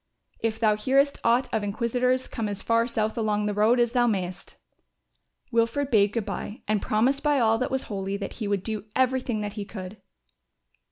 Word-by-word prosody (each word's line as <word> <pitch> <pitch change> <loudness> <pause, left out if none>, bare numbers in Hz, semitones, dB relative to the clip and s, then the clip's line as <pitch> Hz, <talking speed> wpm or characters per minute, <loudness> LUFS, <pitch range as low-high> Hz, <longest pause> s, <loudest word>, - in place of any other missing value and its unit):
If 225 -1 -2
thou 215 -2 +3
hearest 275 +6 +2
aught 240 +3 +3
of 220 -2 0
inquisitors 245 +5 0
come 225 -3 -3
as 205 -1 -5
far 230 0 +2
south 220 -1 -1
along 210 -1 0
the 210 - 0
road 215 +4 +3
as 240 -1 +3
thou 240 -1 +3
mayest." 190 -3 -3 0.9
Wilfred 235 +5 +1
bade 205 -2 +4
good 230 -4 -1
bye 205 +2 -6
and 210 -1 +1
promised 255 +6 +1
by 295 -2 +2
all 225 -1 +3
that 255 - -1
was 265 0 -1
holy 195 -1 -3
that 200 -1 -5
he 210 - -1
would 200 -2 0
do 215 -2 -4
everything 255 -3 +1
that 205 -1 -4
he 210 -2 -4
could. 200 -1 -9
220 Hz, 190 wpm, -26 LUFS, 205-245 Hz, 0.9 s, bade